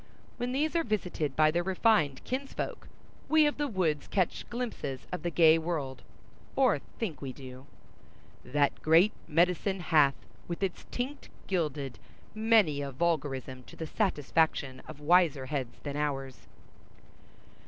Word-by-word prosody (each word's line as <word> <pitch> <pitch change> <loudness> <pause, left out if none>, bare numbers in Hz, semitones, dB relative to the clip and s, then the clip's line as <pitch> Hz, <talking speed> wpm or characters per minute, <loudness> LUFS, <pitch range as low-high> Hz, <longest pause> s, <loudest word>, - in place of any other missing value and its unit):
When 245 0 -2
these 300 +5 0
are 335 - +3
visited 180 - -2
by 155 0 +5
their 170 +2 +1
refined 180 - +2
kinsfolk, 270 +2 -4 0.4
we 315 -1 +6
of 295 - 0
the 295 - +1
woods 175 - 0
catch 185 -4 -1
glimpses 235 - -4
of 180 - -3
the 175 - -1
gay 165 -1 +6
world, 155 -5 -3 0.5
or 255 - +4 0.2
think 185 -10 -4
we 135 -2 -4
do. 130 0 -11 0.8
That 145 +1 0
great 165 +7 +5
medicine 180 +4 +2
hath 150 -6 +4 0.3
With 170 +2 -4
its 190 -2 -3
tinct 260 +4 -4 0.2
gilded— 150 -8 -2 0.3
many 215 -9 +3
a 140 -1 -4
vulgarism 135 -4 -1
to - - -13
the 160 - -5
satisfaction 155 - 0
of 155 -2 -9
wiser 155 -4 +4
heads 130 -4 -4
than 145 -1 -4
ours. 135 -3 -3
160 Hz, 140 wpm, -30 LUFS, 140-200 Hz, 0.8 s, we